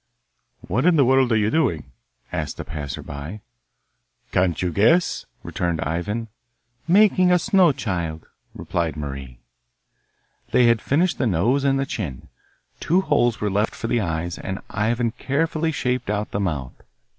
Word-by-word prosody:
'What 120 - 0
in 180 - +5
the 140 -4 +5
world 130 -1 +3
are 110 - +4
you 105 0 +1
doing?' 85 - 0 0.4
asked - - -4
a - - -5
passer 70 -4 -6
by. 75 +9 -7 0.9
'Can't 90 -2 +1
you 90 -1 0
guess?' 115 - +2 0.2
returned 85 -2 -2
Ivan. 105 +9 -2 0.6
'Making 185 -1 +5
a 180 - +6
snow 185 -2 +4
child,' 85 - -3 0.3
replied 85 -2 -2
Marie. 70 -4 -7 1.1
They 125 - +5
had 115 -1 +4
finished 170 +6 +1
the 130 - +2
nose 115 +9 +2
and 135 -1 +2
the 135 - 0
chin. 85 - -5 0.5
Two 180 +4 +2
holes 130 -9 +1
were 105 -1 -1
left 105 +3 0
for - - -6
the 115 0 +1
eyes, 85 -1 -3
and 95 0 -4
Ivan 115 +3 0
carefully 160 +5 -1
shaped 125 -5 -2
out 105 0 -2
the 100 - -2
mouth. 75 -10 -3
110 Hz, 155 wpm, -23 LUFS, 85-140 Hz, 1.1 s, a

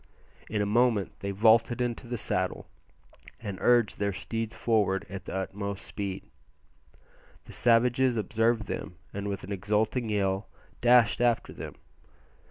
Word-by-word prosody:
In 105 -2 0
a - - 0
moment 110 -1 +1
they 100 - -4
vaulted 110 +4 +4
into 120 0 -2
the 120 0 -3
saddle 95 -3 -1 0.7
and 100 -4 -6
urged 120 -4 +3
their 100 0 +1
steeds 115 +3 -4
forward 105 -4 +1
at 95 -2 -7
the - - -5
utmost 100 +1 -4
speed. 100 -2 -5 1.2
The - - -12
savages 120 +1 +3
observed 110 +2 +1
them, 90 - -5 0.2
and 100 0 -4
with 100 -1 -4
an 100 - -8
exulting 105 +4 0
yell 100 -1 0 0.3
dashed 120 -1 +5
after 120 -1 +1
them. - - -8
110 Hz, 140 wpm, -28 LUFS, 100-120 Hz, 1.2 s, dashed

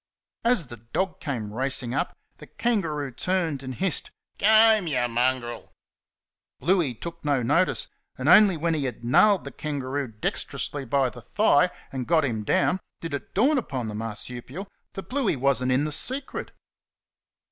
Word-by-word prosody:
As 235 -8 +3
the 120 -1 -10
dog 180 - -3
came 115 - -4
racing 130 0 -1
up, - - -2 0.2
the - - -12
kangaroo 165 - -1
turned 165 +1 -1
and 130 -1 -6
hissed, 190 -3 -1 0.3
"G' 200 - +3
home, 220 -3 +6
y' 130 -5 +1
mongrel!" 120 0 -1 0.9
Bluey 165 -4 +2
took 170 +7 -8
no 140 -4 +1
notice, 170 +10 +2 0.3
and - - -3
only 200 -5 +7
when 165 +2 0
he 150 -3 -1
had 120 -2 -5
nailed 195 - +5
the - - -7
kangaroo 140 -2 -3
dextrously 135 +4 -3
by 130 0 +1
the - - -11
thigh - - +3 0.2
and 130 -2 -4
got 160 -3 +3
him 110 -5 -2
down 185 - +2 0.2
did 165 -3 -6
it 140 - -6
dawn 270 +8 +4
upon 130 - -4
the - - -5
marsupial 120 - -6 0.3
that 195 - -6
Bluey 255 - 0
was 135 -1 +1
n't 130 - +1
in 135 +3 +2
the 155 - -2
secret. 260 - -2
145 Hz, 165 wpm, -26 LUFS, 125-185 Hz, 0.9 s, only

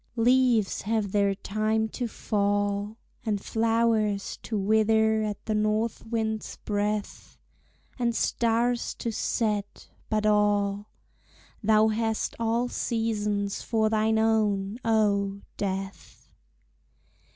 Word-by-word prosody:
Leaves 240 -3 +3
have 210 -1 -1
their 200 -1 +2
time 215 +2 -1
to 245 +2 -4
fall, 205 0 -1 0.3
And 215 -3 -1
flowers 225 -2 0
to 220 - -3
wither 220 +2 +3
at 210 -2 -4
the 220 - -1
north 215 +2 0
wind's 220 -1 -2
breath, 210 0 -3 0.6
And 235 -1 0
stars 235 +1 0
to 230 - -3
set 210 -2 -2 0.2
but 215 -1 0
all, 205 -1 +2 0.7
Thou 215 0 +4
hast 220 0 -1
all 230 +2 +1
seasons 210 -4 -1
for 220 -2 +1
thine 220 0 +2
own, 215 -1 +1
oh! 200 -3 +1 0.2
Death. 195 0 -5
215 Hz, 105 wpm, -27 LUFS, 205-225 Hz, 0.7 s, Thou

